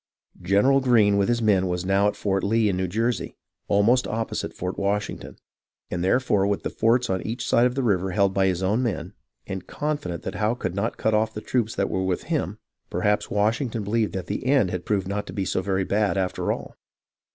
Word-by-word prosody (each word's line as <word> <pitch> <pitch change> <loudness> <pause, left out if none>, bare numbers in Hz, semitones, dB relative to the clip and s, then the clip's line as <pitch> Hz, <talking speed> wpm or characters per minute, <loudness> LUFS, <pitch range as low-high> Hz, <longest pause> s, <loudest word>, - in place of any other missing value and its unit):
General 100 +10 +4
Greene 115 -6 +4
with 100 +1 +2
his 120 -1 +1
men 95 -3 +3
was 90 0 -2
now 100 +2 +3
at 105 - -1
Fort 95 -2 -1
Lee 110 +2 +2
in 95 - 0
New 95 0 -1
Jersey, 115 +6 -2 0.3
almost 115 +6 +3
opposite 115 +1 -3
Fort 90 +1 -5
Washington; 100 +1 -2 0.5
and 90 0 -2
therefore, 100 -1 +2
with 100 0 -1
the - - -3
forts 120 +2 +2
on 95 -4 -1
each 115 +3 -4
side 120 +1 +4
of 125 - -4
the 135 - 0
river 95 -5 +1
held 100 +1 +2
by 95 0 +2
his 95 0 -1
own 105 +6 +1
men, 95 -6 -3 0.3
and 95 -1 -6
confident 145 - -3
that 95 - -4
Howe 105 +3 0
could 95 -7 -3
not 100 +5 -2
cut 110 - +1
off 110 +1 +1
the - - -3
troops 115 0 -1
that 100 - 0
were 95 - 0
with 95 -1 -1
him, - - -2 0.3
perhaps 105 +4 0
Washington 110 +2 0
believed 110 +1 0
that 95 -1 -4
the 105 - -4
end 130 -9 +3
had 90 -1 -5
proved 100 -3 0
not 100 +1 -3
to - - -7
be 100 -2 -2
so 95 - 0
very 95 0 0
bad 100 +1 +1
after 95 -1 -1
all. - - -6
100 Hz, 220 wpm, -24 LUFS, 95-115 Hz, 0.5 s, General